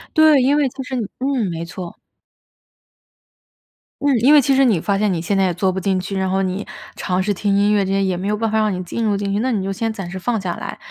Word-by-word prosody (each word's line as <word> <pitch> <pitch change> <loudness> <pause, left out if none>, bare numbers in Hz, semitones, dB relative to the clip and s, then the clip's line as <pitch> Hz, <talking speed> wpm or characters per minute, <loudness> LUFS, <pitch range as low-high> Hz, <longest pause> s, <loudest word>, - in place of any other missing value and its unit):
对， 310 -3 +6
因 270 +3 +3
为 290 -2 +2
它 265 +1 -7
是 260 +1 -5
你 230 -5 -2
嗯， 260 -5 0
没 165 0 -4
错。 175 +1 -8 2.1
嗯， 285 -3 +2
因 265 +7 +5
为 295 - +8
其 270 +1 +2
实 270 0 +4
你 210 -10 +2
发 200 +2 0
现 210 -2 +1
你 165 - -2
现 195 +3 -1
在 195 - +3
也 180 - 0
做 185 +2 0
不 190 - -3
进 190 0 0
去， 195 +1 -4
然 190 0 0
后 190 +1 +1
你 190 +2 -2 0.3
尝 185 0 -1
试 205 - 0
听 200 +1 0
音 205 +1 +3
乐 200 -2 +2
这 190 - -2
些 195 0 +1
也 185 -2 0
没 185 +3 -4
有 210 - +1
办 225 0 -1
法 220 - +1
让 215 -2 +1
你 180 - -4
进 205 +6 -4
入 210 -2 +1
进 200 0 -2
去。 205 - 0
那 255 +3 0
你 205 -5 -1
就 195 - -2
先 225 +3 -2
暂 195 -5 -6
时 190 - -5
放 225 +3 -1
下 180 -2 -3
来， - - -7
200 Hz, 305 characters per minute, -19 LUFS, 190-235 Hz, 2.1 s, 为